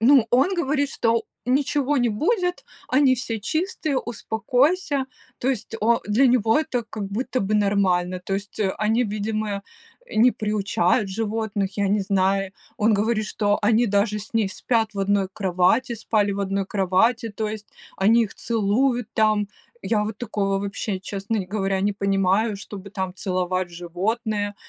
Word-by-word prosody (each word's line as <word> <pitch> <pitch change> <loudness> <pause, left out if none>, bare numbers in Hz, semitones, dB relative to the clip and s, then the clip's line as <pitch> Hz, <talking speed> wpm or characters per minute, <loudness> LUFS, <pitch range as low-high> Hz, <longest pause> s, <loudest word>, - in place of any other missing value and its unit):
Ну, 250 0 +6
он 270 +11 +3
говорит, 285 -4 0
что 230 -2 +1 0.2
ничего 280 +2 +1
не 245 -2 +2
будет, 360 - 0 0.2
они 260 0 +4
все 230 -3 -4
чистые, 315 - -1
успокойся. 265 - 0 0.3
То 255 - -1
есть 230 -3 -2
о 230 +2 +3
для 225 +6 +4
него 240 0 +3
это 250 -6 -1
как 215 -2 -5
будто 245 +6 -2
бы 200 +2 0
нормально. 185 -3 +1
То 195 - -2
есть, 200 +2 -5
э, 195 -2 +2
они, 220 +3 +2
видимо, 215 +1 -2 0.6
э, - - -9
не 240 +3 +6
приучают 210 -1 0
животных, 205 -1 -2
я 200 -1 +2
не 205 +1 +2
знаю. 195 0 +1 0.2
Он 215 0 +3
говорит, 215 +1 0
что 205 -1 0
они 225 +3 +3
даже 205 +1 +1
с 215 +2 -9
ней 215 -4 +2
спят 225 +2 0
в - - -6
одной 195 -1 +1
кровати, 195 +6 +1
спали 210 -2 0
в 200 - -3
одной 195 0 -1
кровати, 210 +5 +1
то 215 +1 -3
есть 215 0 -7 0.3
они 225 +4 +4
их 205 - -9
целуют 235 +2 0
там. 215 -2 +2 0.3
Я 210 +1 +1
вот 215 -1 -5
такого 195 -4 -1
вообще, 200 0 -3
честно 200 +3 -3
говоря, 195 -1 -1
не 205 +1 +1
понимаю, 195 +2 +1
чтобы 200 0 -9
там 190 -3 -4
целовать 185 -1 -1
животное, 205 +5 -2
215 Hz, 160 wpm, -23 LUFS, 195-235 Hz, 0.6 s, Ну